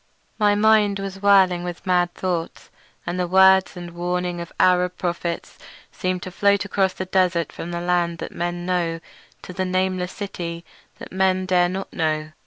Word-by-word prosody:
My 205 -1 +4
mind 210 -1 +4
was 195 0 -6
whirling 190 -3 +4
with 175 -1 -7
mad 180 -1 +2
thoughts, 175 -3 -4 0.3
and 175 +1 -3
the 180 - 0
words 190 +1 +5
and 175 -1 -7
warnings 175 0 -2
of 170 - -8
Arab 180 0 +3
prophets 170 -1 -4 0.3
seemed 185 -1 -3
to 185 - -7
float 200 +1 +2
across 190 -1 0
the 185 - -5
desert 180 -3 +1
from 170 - -7
the 170 0 -4
lands 175 -1 0
that - - -6
men 175 0 -4
know 175 -2 -1 0.4
to 180 - -8
the 185 - -2
nameless 185 0 -1
city 170 -4 -6 0.3
that - - -10
men 185 0 +1
dare 180 -1 +3
not 190 +2 -5
know. 155 -1 -1
180 Hz, 175 wpm, -22 LUFS, 175-190 Hz, 0.4 s, words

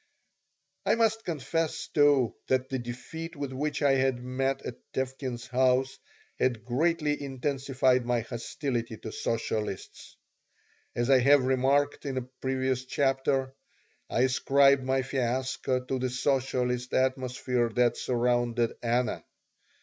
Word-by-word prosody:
I - - +3
must 225 -1 +1
confess, 165 0 -2
too, 145 -5 +4
that 130 0 +1
the 130 - -2
defeat 160 +8 -7
with 140 -2 -4
which 145 +2 -2
I 140 - +5
had 135 -1 +2
met 135 +2 -1
at 120 - -6
Tevkin's 130 -2 -3
house 130 +1 +1 0.4
had 120 -4 0
greatly 150 +3 +1
intensified 135 -2 0
my 120 -1 0
hostility 115 0 -4
to 110 - -7
socialists. 110 -3 -4 0.8
As 120 +3 +1
I 130 - +7
have 140 +2 +5
remarked 135 +3 +1
in 135 -1 -3
a 130 - -1 0.2
previous 130 -1 -1
chapter, 135 0 0 0.6
I 120 - +1
ascribed 135 +1 +4
my 130 0 +1
fiasco 130 0 -1
to 130 0 -2
the 130 0 -1
socialist 125 -1 0
atmosphere 130 -2 0
that 120 -1 +3
surrounded 120 -1 +1
Anna. 120 0 0
130 Hz, 125 wpm, -28 LUFS, 125-135 Hz, 0.8 s, I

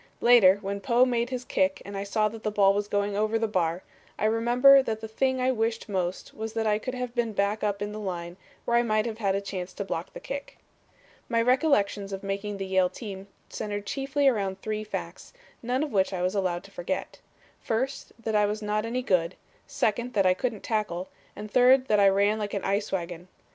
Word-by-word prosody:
Later, 225 -6 +6
when 200 +1 -3
Poe 245 +1 +4
made 240 -1 0
his 250 -1 -4
kick 190 0 +1
and 200 +1 -7
I 195 - -3
saw 215 +2 +1
that 225 +1 -10
the 215 - -1
ball 200 -2 +4
was 205 +1 -1
going 205 0 -1
over 215 +2 +1
the 225 0 0
bar, 175 -3 -1 0.3
I - - -1
remember 240 +5 +6
that 225 -4 -3
the 220 - -6
thing 260 +4 0
I 255 +1 +2
wished 225 -1 -1
most 185 -3 -3
was 220 0 -5
that 225 -1 -1
I 210 -1 +2
could 255 +3 -5
have 250 -1 -4
been 230 -4 -2
up 205 0 0
in 205 - -4
the 215 - -6
line 175 -4 -5 0.3
where 235 - +1
I - - +5
might 215 -2 +1
have 225 -1 -4
had 195 -3 +1
a 200 - -1
chance 185 -2 -5
to 200 - -5
block - - -4
the - - -7
kick. - - -7 0.7
"My 230 - +2
recollections 230 -6 +2
of 195 0 -5
making 200 +1 -3
the 195 - -4
Yale 190 -1 +2
team 195 -3 -8 0.2
centered 205 -1 -5
chiefly 275 +3 0
around 195 -6 +1
three 215 0 -2
facts, 215 - -7 0.3
none 250 +4 0
of 300 - -4
which 190 -1 +1
I 180 -1 -2
was 185 +1 0
allowed 185 -4 -1
to - - -15
forget. - - -4 0.4
First, 260 +5 -2
that 225 -1 -4
I 210 -1 +4
was 210 +1 -3
not 210 +1 -1
any 250 +2 -2
good, 180 -5 +1 0.3
second 235 +3 -1
that 195 -2 +2
I 185 - +5
couldn't 220 +1 -3
tackle, 210 -5 -2 0.3
and 210 0 -8
third 255 +2 +5
that 210 -1 +4
I 200 -1 +6
ran 200 +2 +2
like 210 -1 -3
an 200 - -3
ice 200 +2 -1
wagon. 175 -1 -4
210 Hz, 220 wpm, -27 LUFS, 195-235 Hz, 0.7 s, Later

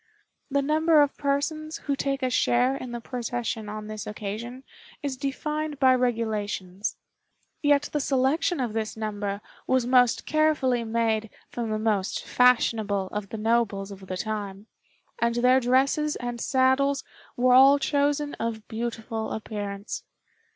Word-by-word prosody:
The 280 0 +1
number 310 +1 +4
of 285 - -2
persons 310 +2 -1
who 280 - 0
take 275 0 -2
a 255 - +1
share 245 +2 +2
in 255 -3 -6
the 240 - -4
procession 235 -3 -4
on 215 0 -6
this 215 -1 -6
occasion 220 +5 -6 0.4
is 280 -2 -2
defined 300 +2 -3
by 260 -1 +6
regulations; 215 -6 -1 0.6
yet 290 -1 +4
the 300 - +1
selection 280 +6 +1
of 240 -4 -1
this 220 0 -3
number 205 -2 -3 0.3
was 260 -2 +2
most 250 -1 +3
carefully 300 -6 +2
made 225 -1 0 0.2
from 235 -2 -3
the 215 - 0
most 215 -3 -1
fashionable 220 -6 +2
of 205 -2 -4
the 225 - -5
nobles 215 -3 0
of 190 -1 -11
the 185 - -4
time, 205 -1 -4 0.6
and 235 0 +2
their 250 +2 +4
dresses 270 +4 +2
and 240 -1 -5
saddles 270 +1 +2 0.3
were 250 +1 +4
all 270 +2 +8
chosen 290 +1 0
of 225 -1 -3
beautiful 225 -1 -4
appearance. 205 -2 -5
240 Hz, 145 wpm, -26 LUFS, 215-275 Hz, 0.6 s, all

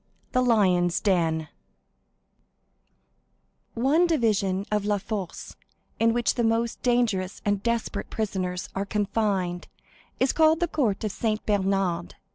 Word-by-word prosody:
The 255 - +2
Lions' 185 -7 +3
Den 165 -5 +1 2.3
One 285 +9 +3
division 205 - +1
of 210 -1 +1
La 205 0 +1
Force, 200 -3 -6 0.4
in 230 0 +4
which 240 0 +1
the 240 - -1
most 230 +1 0
dangerous 225 -7 0
and 205 -1 +1
desperate 235 0 -2
prisoners 185 -4 -3
are 195 - -1
confined, 200 -3 -1 0.5
is 260 - +2
called 315 0 +4
the 345 - +1
court 240 -12 0
of 215 - -1
Saint 215 +1 -2
Bernard. 195 -4 0
210 Hz, 120 wpm, -26 LUFS, 190-235 Hz, 2.3 s, in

